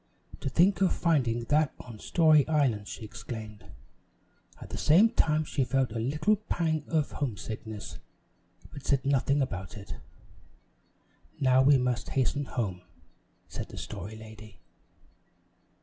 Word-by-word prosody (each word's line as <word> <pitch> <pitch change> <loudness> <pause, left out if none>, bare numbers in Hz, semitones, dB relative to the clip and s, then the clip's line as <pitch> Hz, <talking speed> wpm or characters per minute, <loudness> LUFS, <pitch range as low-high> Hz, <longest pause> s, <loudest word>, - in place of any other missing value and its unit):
"To - - -3
think 185 +8 +3
of 190 - +4
finding 125 -9 +1
that 150 +4 +1
on 115 -3 -10
Story 155 -2 +4
Island!" 130 -10 +1
she 110 - -7
exclaimed. 110 -1 -8 0.9
At - - -11
the - - -4
same 195 +9 +5
time 155 -8 +2
she 140 - 0
felt 130 -1 0
a 115 - -3
little 150 - +1
pang 160 -7 -1
of 155 -3 0
homesickness, 110 - -5 0.7
but 145 - -9
said 140 -1 +1
nothing 140 +1 +2
about 100 -3 -6
it. 100 - -8 1.4
"Now 130 -1 +4
we 140 +1 +6
must 125 -2 -1
hasten 140 +2 +1
home," 100 -9 -3 0.7
said - - -6
the - - -10
Story 105 +5 -7
Lady. 110 -2 -12
130 Hz, 135 wpm, -29 LUFS, 110-150 Hz, 1.4 s, we